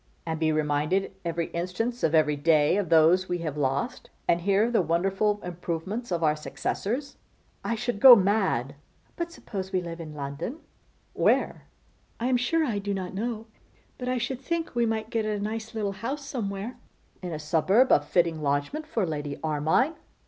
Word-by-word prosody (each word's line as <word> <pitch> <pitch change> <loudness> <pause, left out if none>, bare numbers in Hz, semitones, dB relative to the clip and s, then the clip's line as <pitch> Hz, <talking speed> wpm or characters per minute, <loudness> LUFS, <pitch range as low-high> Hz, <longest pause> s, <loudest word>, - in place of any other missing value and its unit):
'And 160 -1 -3
be 160 -1 +2
reminded 155 +6 0
every 170 -1 -2
instant 185 +8 -2
of 160 0 +2
every 150 -1 +4
day 150 +1 +3
of 200 -5 -1
those 170 +3 +5
we 180 - 0
have 150 -2 -3
lost; 140 -1 -2 0.2
and 170 0 +3
hear 200 +3 +3
of 240 +2 0
the 225 - +4
wonderful 195 +5 +1
improvements 180 +6 -4
of 170 -1 0
our 150 -1 +3
successors. 240 - -3 0.5
I 230 - -1
should 225 -1 -3
go 255 +1 +11
mad.' 190 - +1 0.4
'But 340 0 -3
suppose 195 - -6
we 185 - +1
live 170 -1 -6
in 155 -2 -8
London?' 145 - -5 0.6
'Where?' - - +1 0.5
'I 235 - -2
am 255 - +3
sure 315 +7 +1
I 220 -7 -1
do 200 0 -2
not 185 -1 -4
know; 220 +2 -3 0.5
but 250 0 -3
I 255 - +1
should 245 +2 -3
think 330 +4 -2
we 235 -1 +2
might 220 0 -2
get 225 -2 0
a 210 -1 -1
nice 220 +2 -4
little 210 -2 -1
house 260 +9 -5
somewhere.' 225 -2 -4 0.4
'In 180 -1 -5
a 155 - -3
suburb! 170 - +3
a - - +6
fitting 165 +1 +1
lodgment 145 - -1
for 225 -10 0
Lady 145 -3 -4
Armine. 155 - +2
190 Hz, 180 wpm, -27 LUFS, 160-230 Hz, 0.6 s, go